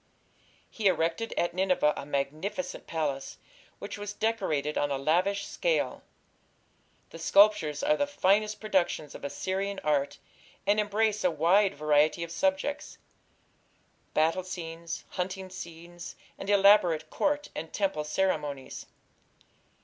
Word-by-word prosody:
He 215 -3 -1
erected 170 +5 +1
at 175 0 +1
Nineveh 180 -5 +2
a 140 - -7
magnificent 155 - -3
palace, 145 -4 -3 0.4
which 200 0 -7
was 205 0 -5
decorated 190 -11 -1
on 145 - +1
a 140 - -1
lavish 180 +8 +1
scale. - - -1 1.1
The 165 - -10
sculptures 195 - +4
are 300 +1 +4
the 285 -1 0
finest 210 -5 +2
productions 180 -8 0
of - - -10
Assyrian 190 +7 -2
art, 145 -1 +1 0.5
and 205 +1 +3
embrace 210 0 +1
a 180 - +4
wide 190 +4 +3
variety 150 +2 +2
of 170 - -7
subjects 285 +5 -1 1.2
battle 160 +4 +3
scenes, 170 -2 -6
hunting 185 +1 -4
scenes, 170 -1 -9 0.2
and 195 - -7
elaborate 195 -6 +5
Court 295 0 0
and 160 +1 -6
temple 195 -7 -1
ceremonies. 150 -4 -2
185 Hz, 120 wpm, -29 LUFS, 155-205 Hz, 1.2 s, elaborate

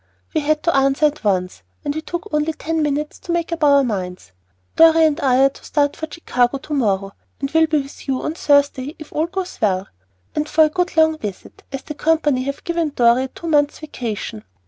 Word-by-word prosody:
We 315 - +1
had 305 +1 0
to 335 - +2
answer 275 +2 +3
at 300 -2 0
once, 185 -3 0 0.2
and 285 - 0
we 315 - -4
took 345 +5 -5
only 300 +1 +1
ten 320 +1 -2
minutes 295 0 -2
to 345 - -6
make 340 0 -1
up 335 -1 -2
our 280 -1 +6
minds. 185 - -4 0.4
Dorry 325 0 +6
and 310 0 +1
I 265 -3 +3
are 275 - +6
to - - -17
start 285 -1 0
for 315 - -5
Chicago 250 -5 0
to 285 +3 -7
morrow, 195 -7 0 0.3
and 275 0 -3
will 320 0 +4
be 305 -2 +1
with 275 - -13
you 265 -1 0
on 310 - -2
Thursday 285 -2 +1
if 310 -1 -12
all 315 +2 0
goes 370 +1 -5
well, 190 -3 0 0.4
and 300 0 -2
for 315 +1 +5
a 310 - +3
good 360 +1 -2
long 315 -1 +4
visit, 205 -7 -7
as 270 -1 -5
the 300 - -6
company 300 -4 +1
have 280 0 -4
given 340 -2 -1
Dorry 240 +2 +4
a - - -5
two 335 - -12
months' 295 -3 +2
vacation. 225 - -5
295 Hz, 220 wpm, -20 LUFS, 260-315 Hz, 0.4 s, our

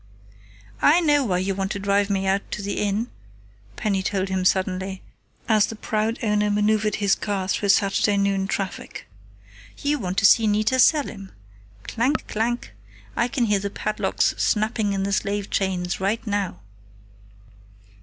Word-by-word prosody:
"I 320 +4 +6
know 295 -4 +3
why 190 -7 0
you 190 +2 -1
want 195 0 -2
to 200 - -5
drive 200 0 +1
me 195 -1 0
out 195 +1 0
to 210 - -4
the 200 0 -3
Inn," 210 +4 -1 0.6
Penny 195 - -1
told 190 0 -1
him 190 -1 -1
suddenly, 190 0 0 0.4
as 215 -2 +4
the 225 - -6
proud 220 +1 -1
owner 210 -1 +1
maneuvered 210 0 +1
his 200 -2 +2
car 195 -2 -2
through 200 +1 -1
Saturday 200 +1 +3
noon 195 -1 +1
traffic. 195 -1 -5 0.7
"You 290 +1 -1
want 185 -3 -4
to 200 - +3
see 220 +2 +6
Nita 215 +5 +1
Selim. 255 -10 +2 0.5
Clank! 240 - -1
Clank! 235 - -2 0.4
I 235 - +1
can 250 -1 0
hear 205 -2 +2
the 200 +1 -3
padlocks 215 +1 -1
snapping 215 -1 +1
on 195 - -1
the 200 0 -1
slave 200 +1 -2
chains 180 -2 -1
right 200 +5 -1
now." 200 - -2
205 Hz, 155 wpm, -23 LUFS, 195-215 Hz, 0.7 s, I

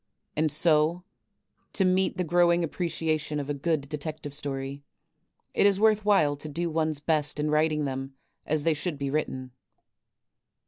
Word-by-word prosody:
And 155 0 +1
so, 155 +2 +2 0.7
to 190 - +2
meet 185 0 +2
the 180 - +1
growing 175 +1 +3
appreciation 160 -2 -2
of 145 0 -3
a - - 0
good 145 0 -1
Detective 150 0 -6
Stor}*, 140 -2 -3
it 135 +1 -6 0.7
is 200 -1 +4
worth 215 -1 +4
while 155 -9 +4
to 150 +2 -7
do 170 +3 -2
one's 155 -2 0
best 150 -1 0
in 150 0 0
writing 155 -1 +2
them 135 0 -5 0.3
as 155 -1 0
they 165 - +3
should 155 +1 -3
be 140 -1 -3
^Titten. 130 -4 -2
155 Hz, 155 wpm, -27 LUFS, 145-170 Hz, 0.7 s, is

